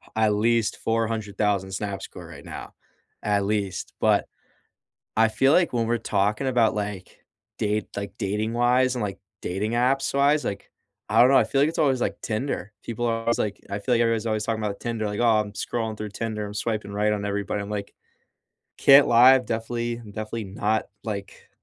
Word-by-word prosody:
at 110 Hz, -1 st, +3 dB
least 115 Hz, +1 st, +1 dB
400,000 105 Hz, -3 st, -1 dB
Snapscore 95 Hz, -3 st, -5 dB
right 70 Hz, -4 st, -11 dB
now. -, -, -8 dB, 0.5 s
At 100 Hz, -1 st, +1 dB
least, 100 Hz, -2 st, -2 dB
but, -, -, +3 dB, 0.9 s
I 115 Hz, 0 st, +6 dB
feel 135 Hz, +6 st, +3 dB
like 175 Hz, 0 st, +3 dB
when 115 Hz, -2 st, +1 dB
we're 120 Hz, 0 st, +1 dB
talking 105 Hz, +4 st, 0 dB
about, 120 Hz, -3 st, +3 dB
like, 100 Hz, -3 st, -5 dB, 0.4 s
date 105 Hz, 0 st, 0 dB
like, 100 Hz, +1 st, -6 dB
dating-wise 120 Hz, +5 st, +1 dB
and, 120 Hz, -, -2 dB
like, 100 Hz, -2 st, -4 dB, 0.2 s
dating 100 Hz, +5 st, -2 dB
apps-wise, 135 Hz, +4 st, +2 dB
like, 100 Hz, -, -4 dB, 0.4 s
I -, -, +3 dB
don't 125 Hz, -, +7 dB
know, 135 Hz, -, +7 dB
I -, -, +4 dB
feel 135 Hz, -, +1 dB
like 150 Hz, -, +4 dB
it's -, -, -5 dB
always, 135 Hz, -4 st, +2 dB
like, -, -, -1 dB
Tinder, 110 Hz, -3 st, -3 dB
people 120 Hz, +1 st, -3 dB
are 115 Hz, -1 st, 0 dB
always, 115 Hz, +1 st, 0 dB
like 105 Hz, -1 st, -2 dB
I 100 Hz, -, -3 dB
feel 125 Hz, +5 st, 0 dB
like 120 Hz, -, +3 dB
everybody's 115 Hz, -1 st, +1 dB
always 110 Hz, -1 st, 0 dB
talking 110 Hz, -1 st, -2 dB
about 100 Hz, -1 st, -3 dB
Tinder, 115 Hz, -2 st, -2 dB
like, 105 Hz, +1 st, -4 dB
"Oh, 115 Hz, -2 st, +4 dB
I'm 105 Hz, -1 st, -7 dB
scrolling 110 Hz, +1 st, -3 dB
through 105 Hz, 0 st, -5 dB
Tinder. 105 Hz, 0 st, -4 dB
I'm 100 Hz, -, -7 dB
swiping 110 Hz, -2 st, -2 dB
right 105 Hz, +1 st, +1 dB
on 105 Hz, -1 st, -3 dB
everybody." 100 Hz, 0 st, -2 dB
I'm 100 Hz, -, -7 dB
like, 100 Hz, -1 st, -4 dB, 0.9 s
can't 140 Hz, +1 st, +7 dB
lie, 125 Hz, +3 st, +8 dB
I've 130 Hz, -1 st, 0 dB
definitely 115 Hz, +1 st, -2 dB
definitely 110 Hz, 0 st, -6 dB
not 105 Hz, +3 st, -1 dB, 0.2 s
like, 100 Hz, -3 st, -6 dB
110 Hz, 185 wpm, -25 LUFS, 105-120 Hz, 0.9 s, lie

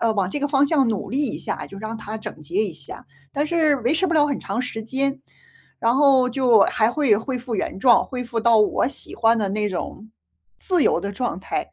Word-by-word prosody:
呃， 225 Hz, -1 st, +2 dB
往 195 Hz, -3 st, 0 dB
这 290 Hz, -, -3 dB
个 290 Hz, -, +1 dB
方 285 Hz, 0 st, +2 dB
向 275 Hz, -4 st, +2 dB
努 210 Hz, -, -3 dB
力 275 Hz, +4 st, 0 dB
一 -, -, -5 dB
下， -, -, -4 dB
就 195 Hz, -, -11 dB
让 220 Hz, +2 st, -5 dB
它 220 Hz, 0 st, -7 dB
整 155 Hz, -7 st, -9 dB
洁 170 Hz, +6 st, -7 dB
一 185 Hz, -, -5 dB
下。 140 Hz, -, -11 dB, 0.3 s
但 290 Hz, +2 st, -1 dB
是 310 Hz, -3 st, +2 dB
维 250 Hz, +4 st, 0 dB
持 375 Hz, +4 st, +1 dB
不 340 Hz, -, -1 dB
了 295 Hz, -1 st, +4 dB
很 285 Hz, -, -2 dB
长 210 Hz, +5 st, -3 dB
时 225 Hz, -3 st, -5 dB
间， 270 Hz, +4 st, -2 dB, 0.6 s
然 230 Hz, +2 st, +2 dB
后 270 Hz, -3 st, +4 dB
就， 240 Hz, -4 st, +4 dB
还 220 Hz, +1 st, +2 dB
会 275 Hz, -9 st, +3 dB
恢 250 Hz, +4 st, -3 dB
复 240 Hz, -2 st, -5 dB
原 190 Hz, -, -3 dB
状， 245 Hz, -1 st, +5 dB
恢 250 Hz, -1 st, -5 dB
复 235 Hz, -1 st, -4 dB
到 230 Hz, 0 st, +4 dB
我 210 Hz, +4 st, +2 dB
喜 -, -, -8 dB
欢 230 Hz, 0 st, +3 dB
的 205 Hz, -2 st, -1 dB
那 210 Hz, +1 st, -1 dB
种 205 Hz, +3 st, -6 dB, 0.5 s
自 360 Hz, -5 st, +1 dB
由 -, -, +2 dB
的 200 Hz, 0 st, -4 dB
状 220 Hz, -4 st, -3 dB
态。 -, -, -4 dB
240 Hz, 255 characters per minute, -22 LUFS, 215-275 Hz, 0.6 s, 状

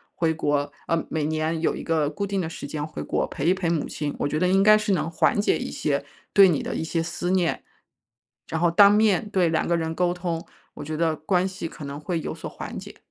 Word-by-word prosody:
回 165 Hz, -1 st, +1 dB
国， 145 Hz, -2 st, 0 dB, 0.2 s
呃， 165 Hz, -1 st, 0 dB
每 155 Hz, -2 st, -1 dB
年 155 Hz, +1 st, -1 dB
有 165 Hz, -, +1 dB
一 -, -, -6 dB
个 155 Hz, -3 st, +1 dB
固 200 Hz, +7 st, -3 dB
定 200 Hz, -1 st, -2 dB
的 160 Hz, -, -3 dB
时 150 Hz, -, -7 dB
间 150 Hz, 0 st, -4 dB
回 -, -, -6 dB
国 -, -, -1 dB
陪 140 Hz, -, -5 dB
一 180 Hz, -, +5 dB
陪 185 Hz, -3 st, -1 dB
母 165 Hz, -3 st, 0 dB
亲， 145 Hz, -1 st, -4 dB
我 145 Hz, -, 0 dB
觉 155 Hz, +2 st, -1 dB
得 180 Hz, -, +2 dB
应 195 Hz, +2 st, +4 dB
该 215 Hz, 0 st, +7 dB
是 210 Hz, -2 st, 0 dB
能 170 Hz, -, 0 dB
缓 185 Hz, -, +2 dB
解 205 Hz, -, +2 dB
一 -, -, -4 dB
些 -, -, -1 dB, 0.3 s
对 195 Hz, -1 st, +8 dB
你 155 Hz, -, 0 dB
的 -, -, -3 dB
一 -, -, -2 dB
些 165 Hz, 0 st, -1 dB
思 175 Hz, +1 st, -3 dB
念。 180 Hz, -3 st, +1 dB, 0.9 s
然 160 Hz, -, -2 dB
后， 175 Hz, -1 st, +3 dB
当 200 Hz, +3 st, +8 dB
面 210 Hz, -1 st, +3 dB
对 185 Hz, -5 st, +2 dB
2 160 Hz, -, 0 dB
个 170 Hz, -, +2 dB
人 160 Hz, 0 st, -2 dB
沟 175 Hz, -1 st, +1 dB
通， 170 Hz, -2 st, -4 dB, 0.3 s
我 -, -, -7 dB
觉 155 Hz, +1 st, -4 dB
得 160 Hz, -1 st, +1 dB
关 180 Hz, +4 st, +1 dB
系 185 Hz, -3 st, -5 dB
可 155 Hz, -, -10 dB
能 140 Hz, +1 st, -6 dB
会 165 Hz, +1 st, -2 dB
有 -, -, -4 dB
所 -, -, -7 dB
缓 -, -, -7 dB
解。 -, -, -11 dB
165 Hz, 270 characters per minute, -25 LUFS, 155-185 Hz, 0.9 s, 对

